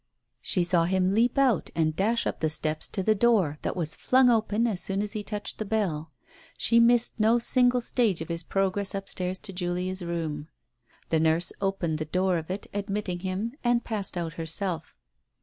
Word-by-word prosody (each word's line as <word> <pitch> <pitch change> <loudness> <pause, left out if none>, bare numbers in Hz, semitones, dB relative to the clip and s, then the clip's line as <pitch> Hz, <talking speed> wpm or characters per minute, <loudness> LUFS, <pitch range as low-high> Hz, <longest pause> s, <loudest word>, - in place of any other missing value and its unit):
She 180 - +1
saw 170 -1 +2
him 185 +1 +1
leap 235 +5 +2
out 260 -8 +2
and 155 -1 +1
dash 225 +6 +1
up - - -2
the 160 - +1
steps 155 0 -1
to 190 - -3
the 215 - +4
door 200 -9 +2
that - - -3
was 160 -4 -3
flung 255 -1 +4
open 225 0 +1
as 210 -6 -1
soon 195 0 0
as 210 - -5
he 215 - -3
touched 210 0 -6
the - - -1
bell. 190 -8 -2 0.5
She 235 - +4
missed 235 0 +3
no 220 +2 +4
single 245 +1 +3
stage 230 -6 +1
of 160 - -5
his 170 -1 -2
progress 195 +2 -1
upstairs 190 -1 -3
to 195 - -8
Julia's 180 +1 -2
room. 160 -3 -3 0.6
The 160 - +2
nurse 160 +2 +2
opened 185 -5 -1
the 155 - -2
door 185 +2 +1
of 160 - -10
it, 190 +2 -4
admitted 200 -3 -3
him, 195 +5 -3
and 240 -1 +2
passed 205 -5 -3
out 165 -2 -3
herself. 165 +1 -3
190 Hz, 190 wpm, -27 LUFS, 170-220 Hz, 0.6 s, the